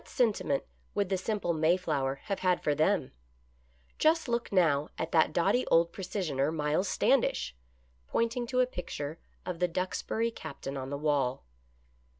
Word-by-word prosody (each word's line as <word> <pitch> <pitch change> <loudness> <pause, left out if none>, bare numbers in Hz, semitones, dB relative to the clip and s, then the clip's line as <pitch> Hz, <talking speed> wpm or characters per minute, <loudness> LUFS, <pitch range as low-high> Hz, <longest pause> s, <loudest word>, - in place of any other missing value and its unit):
What - - -22
sentiment 210 - +1 0.3
would 200 -2 +1
the 190 - +1
simple 200 -3 -1
Mayflower 155 -5 +1
have 195 - -3
had 180 -1 +1
for 150 - +2
them? 155 +2 +1 0.9
Just 320 0 +3
look 235 0 -1
now 155 -6 +3
at 160 - -3
that 160 -2 +4
doughty 195 +10 +2
old 170 0 +4
precisioner. 160 -7 -1
Miles 155 +4 0
Stand 255 +3 +3
ish," 65 +1 -2 0.5
pointing 230 +1 0
to 255 +1 +2
a - - +4
picture 165 - -5 0.3
of 180 -2 -4
the 180 - +3
Duxbury 185 +6 -1
Captain 140 -7 -7
on 130 -1 -4
the 140 - -3
wall. 140 - 0
170 Hz, 155 wpm, -30 LUFS, 150-205 Hz, 0.9 s, that